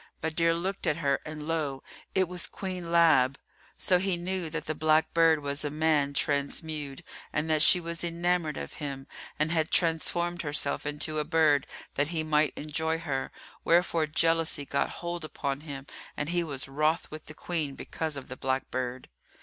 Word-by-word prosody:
Badr 165 +1 +1
looked 190 +4 -2
at 150 - +3
her 140 -4 +1
and 150 0 -6
lo! 150 -5 -1 0.3
it 190 -1 +3
was 180 -1 -4
Queen 180 -3 -5
Lab. 155 -6 +5 0.4
So 180 -1 +3
he 190 -1 +1
knew 180 -1 -1
that 160 -1 -4
the 155 - -1
black 155 +1 +2
bird 165 -2 +4
was 140 +1 0
a 145 - -1
man 150 -2 +2
transmewed 145 +1 -1 0.3
and 150 +1 0
that 155 -1 +3
she 180 - +8
was 170 0 -4
enamoured 170 -2 0
of - - -5
him 135 -2 -4 0.3
and 155 +1 +1
had 160 -1 +1
transformed 170 +1 +1
herself 145 -1 -1
into 150 +1 -1
a - - +1
bird, 155 -3 +3 0.3
that 145 +1 +1
he 160 -1 -1
might 150 -1 +2
enjoy 160 +2 -1
her; 145 -5 -3 0.3
wherefore 170 -2 +3
jealousy 165 -1 +1
got 140 - 0
hold 175 -1 -5
upon 140 -3 -3
him 140 -3 -7 0.3
and 145 - -2
he 175 0 +1
was 140 -5 -4
wroth 155 +4 0
with 155 0 -8
the 155 - -9
Queen 155 -6 -2
because 155 0 -4
of 135 - -7
the 130 - -6
black 130 0 -2
bird. 130 0 -3
155 Hz, 180 wpm, -29 LUFS, 145-170 Hz, 0.4 s, she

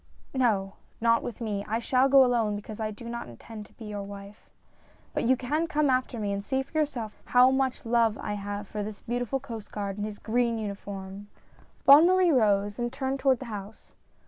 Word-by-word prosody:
" - - -33
No, 210 -7 +1 0.2
not 230 0 +3
with 240 - -7
me. 205 -3 -2
I 220 +2 0
shall 255 +3 +2
go 270 -1 +7
alone, 230 -4 +1
because 210 +1 -8
I 215 -1 -1
do 215 +2 -9
not 235 - -5
intend 210 - -10
to - - -25
be 225 - -11
your 205 -1 -5
wife; 200 +1 -10 0.6
hut - - -1
you 260 +2 +4
can 300 +7 -1
come 300 -3 +2
after 255 -1 0
me 205 -2 -1
and 200 0 -3
see 265 +4 -1
for 275 - -27
yourself 260 -8 -2
how 250 +1 +5
much 265 -2 0
love 230 -2 +2
I 210 - -4
have 205 0 -5
for 210 - -4
this 205 0 -6
beautiful 245 +2 -2
Coast 230 -6 -8
Guard 200 -1 -4
in - - -2
his 210 -1 -5
green 235 +1 0
uniform! 200 -1 -6 0.3
" - - -30
Bonne 290 +5 +9
Marie 370 -1 +4
rose, 205 -4 +2
and 240 0 -1
turned 270 0 -2
toward 265 -2 +3
the 260 - -8
house. 205 +1 -9
230 Hz, 215 wpm, -28 LUFS, 205-260 Hz, 0.6 s, Bonne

